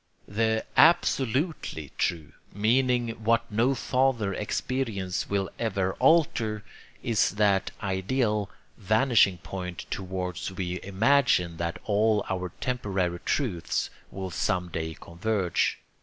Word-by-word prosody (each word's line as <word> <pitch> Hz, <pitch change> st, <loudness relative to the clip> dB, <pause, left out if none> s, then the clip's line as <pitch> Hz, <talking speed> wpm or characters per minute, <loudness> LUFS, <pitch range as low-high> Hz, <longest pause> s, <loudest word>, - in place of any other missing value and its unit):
The 110 Hz, +2 st, 0 dB
'absolutely' 135 Hz, -, +2 dB
true, 80 Hz, -4 st, -1 dB, 0.2 s
meaning 120 Hz, +3 st, +2 dB
what 115 Hz, +1 st, +2 dB
no 120 Hz, +6 st, +2 dB
farther 125 Hz, -7 st, +1 dB
experience 105 Hz, -3 st, -2 dB
will 100 Hz, -1 st, 0 dB
ever 95 Hz, -5 st, 0 dB
alter, 115 Hz, -10 st, +3 dB, 0.4 s
is 110 Hz, -7 st, +2 dB
that 100 Hz, -2 st, +2 dB
ideal 105 Hz, +2 st, 0 dB, 0.3 s
vanishing 110 Hz, -2 st, +3 dB
point 90 Hz, +1 st, -6 dB
towards 90 Hz, -2 st, -3 dB
which 95 Hz, -, -12 dB
we 90 Hz, -1 st, -2 dB
imagine 100 Hz, -4 st, +2 dB
that 85 Hz, +1 st, -2 dB
all 105 Hz, 0 st, +2 dB
our 90 Hz, -2 st, -3 dB
temporary 95 Hz, -8 st, -1 dB
truths 100 Hz, -12 st, -1 dB, 0.2 s
will 95 Hz, -1 st, -6 dB
some 90 Hz, +1 st, -1 dB
day 80 Hz, -1 st, -4 dB
converge. 90 Hz, +1 st, -1 dB
100 Hz, 110 wpm, -27 LUFS, 90-115 Hz, 0.4 s, alter